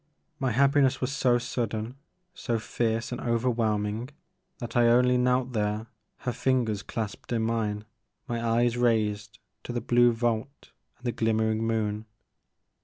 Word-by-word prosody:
My 130 - +1
happiness 140 +1 +3
was 130 +1 -1
so 125 -4 +3
sudden, 115 -2 -3 0.4
so 120 -9 -2
fierce 115 +1 -1
and 125 - -4
overwhelming 115 -1 0 0.5
that 120 - -7
I 120 -1 +5
only 125 +1 +5
knelt 125 0 +1
there, 105 0 -1 0.4
her 125 - -1
fingers 120 -4 0
clasped 110 0 -5
in 115 -2 +1
mine, 110 -2 -1 0.4
my 120 -2 -2
eyes 120 +1 +2
raised 105 -3 +1 0.3
to - - -5
the 120 - -1
blue 120 +1 +4
vault 115 +3 -2 0.3
and 125 - -18
the 120 - +1
glimmering 110 0 +1
moon. 110 -1 -1
115 Hz, 140 wpm, -27 LUFS, 110-125 Hz, 0.5 s, I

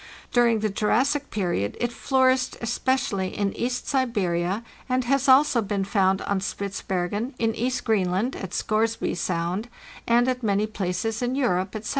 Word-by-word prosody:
During 235 -3 +4
the 215 - +1
Jurassic 270 +8 +1
period 175 - -1
it 240 0 0
flourished 260 +1 +2
especially 235 -5 -1
in 200 -1 0
East 245 +1 -2
Siberia, 205 -7 0 0.3
and 255 0 +1
has 275 +2 +1
also 260 -2 +5
been 200 -1 -1
found 190 -1 +1
on 200 -1 0
Spitzbergen, 200 +4 -3
in 225 -1 +1
East 250 +3 -1
Greenland 200 +2 +1
(at 190 - -6
Scoresby 225 +1 0
Sound), 175 +5 -2 0.4
and 240 +1 +4
at 255 -1 0
many 210 -2 +1
places 215 +2 -2
in 245 +1 0
Europe, 190 -8 0
etc. 215 0 -5
220 Hz, 150 wpm, -25 LUFS, 195-250 Hz, 0.4 s, also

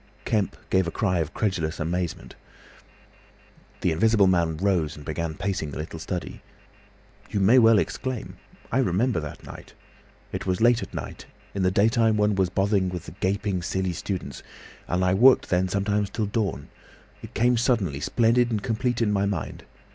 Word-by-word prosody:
Kemp 105 -3 0
gave 95 -2 +3
a - - 0
cry 90 0 0
of 80 - 0
incredulous 85 -3 -2
amazement. 85 +1 -3 1.5
The 90 - +2
Invisible 105 +5 +3
Man 85 -4 +2
rose 90 -4 0
and 75 - -12
began 80 +1 -3
pacing 95 -5 -2
the 70 - -7
little 80 +2 -6
study. 90 +1 -5 0.9
"You 100 - -1
may 110 +7 +6
well 115 -2 +6
exclaim. 130 +3 -3 0.3
I 130 - +2
remember 115 -2 +1
that 75 -1 -8
night. - - -12 0.6
It - - -5
was 90 -1 0
late 120 +1 +4
at - - -8
night—in 100 - -8
the 90 - +3
daytime 110 +3 +3
one 105 0 +2
was 95 -2 +1
bothered 95 -1 +1
with 90 -3 -6
the - - -9
gaping, 95 +1 -1
silly 95 +1 -2
students—and 90 0 -5
I 90 - +3
worked 125 +7 +5
then 90 +1 +2
sometimes 100 +1 0
till 110 +1 -2
dawn. 100 -9 -2 0.5
It - - -11
came 120 +2 +3
suddenly, 110 - +1
splendid 120 +7 +2
and 105 -3 -2
complete 120 0 0
in 105 - +1
my 100 0 +1
mind. 95 -7 -4
100 Hz, 165 wpm, -25 LUFS, 90-110 Hz, 1.5 s, may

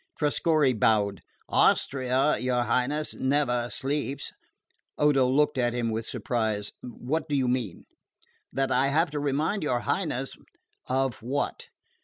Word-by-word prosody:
Trescorre 150 -2 +2
bowed. 105 -2 +2 0.3
"Austria, 130 +2 +2
your 125 -1 +1
Highness, 135 +6 0
never 130 -3 0
sleeps." 140 +1 -2 0.7
Odo 145 -3 +4
looked 135 +1 +2
at 120 -1 +1
him 120 -2 -1
with 110 +1 -3
surprise. 110 -7 -2
"What 150 +6 -4
do 145 - 0
you 130 -2 +1
mean?" 120 -8 -2 0.7
"That 135 0 -1
I 135 - +3
have 160 +3 +2
to 150 - -2
remind 145 +8 0
your 125 -5 0
Highness - - -2 0.3
" - - -51 0.2
"Of 130 -3 -1
what 135 +5 -3
130 Hz, 135 wpm, -27 LUFS, 120-145 Hz, 0.7 s, Odo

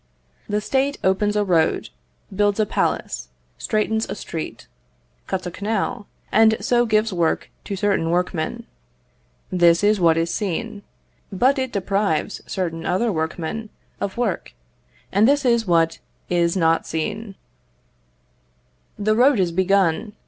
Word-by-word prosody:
The 210 +1 0
State 275 +5 0
opens 205 +2 +2
a 210 - +2
road, 170 - +1 0.5
builds 205 +1 +2
a 215 - +3
palace, 130 - -2 0.3
straightens 220 - 0
a - - -3
street, 165 -5 -6 0.6
cuts 185 -1 -3
a 180 - -4
canal, 205 +1 -2 0.2
and 220 0 +5
so 240 -1 +2
gives 215 -1 +2
work 170 -2 0
to 200 - -3
certain 190 -4 0
workmen 175 -2 -1 0.9
this 175 0 +4
is 210 0 +3
what 165 -2 +4
is 165 +1 0
seen: 210 +2 -3 0.5
but 255 +8 +2
it 260 -1 -2
deprives 195 -4 -1
certain 170 -4 -3
other 220 +5 +1
workmen 165 +6 -3 0.3
of 200 +1 -4
work 235 -7 -2 0.6
and 205 +3 +4
this 285 0 +2
is 235 -3 +2
what 165 -1 +2 0.3
is 170 +1 +2
not 165 -2 +2
seen. 205 +6 -4 1.6
The 215 +1 +1
road 255 0 +4
is 180 -2 +1
begun. 190 +2 +1
200 Hz, 135 wpm, -22 LUFS, 170-220 Hz, 1.6 s, and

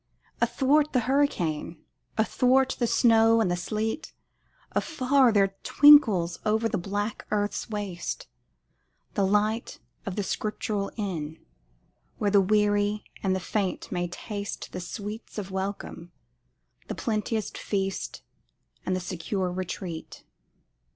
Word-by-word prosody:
Athwart 270 +6 +3
the 250 - +3
hurricane 220 - 0 0.4
athwart 255 +4 +3
the 240 - +2
snow 225 -1 +5
and 200 -5 +2
the - - +2
sleet, 215 - -3 0.6
Afar 270 -4 +3
there 195 -2 +3
twinkles 220 - +6
over 220 +1 +2
the 215 - -1
black 205 +4 -3
earth's 205 +2 -1
waste, 205 -5 -4 0.9
The 200 - +1
light 210 +4 +1 0.3
of 190 - -3
the 205 - -1
Scriptural 210 0 -2
inn 165 -7 -4 0.8
where 205 -1 +1
the 200 -1 +6
weary 205 +1 +2 0.2
and 190 -1 +1
the - - -1
faint 195 0 -2
may 175 0 -1
taste 200 +3 -6
The 180 - -5
sweets 210 +5 -7
of 195 -2 -4
welcome, 190 -3 -5 0.8
the - - -4
plenteous 220 -2 -1
feast 195 -1 -3 0.6
and 185 - 0
the - - -1
secure 180 +1 -3
retreat. 180 -2 -6
205 Hz, 120 wpm, -27 LUFS, 185-225 Hz, 0.9 s, twinkles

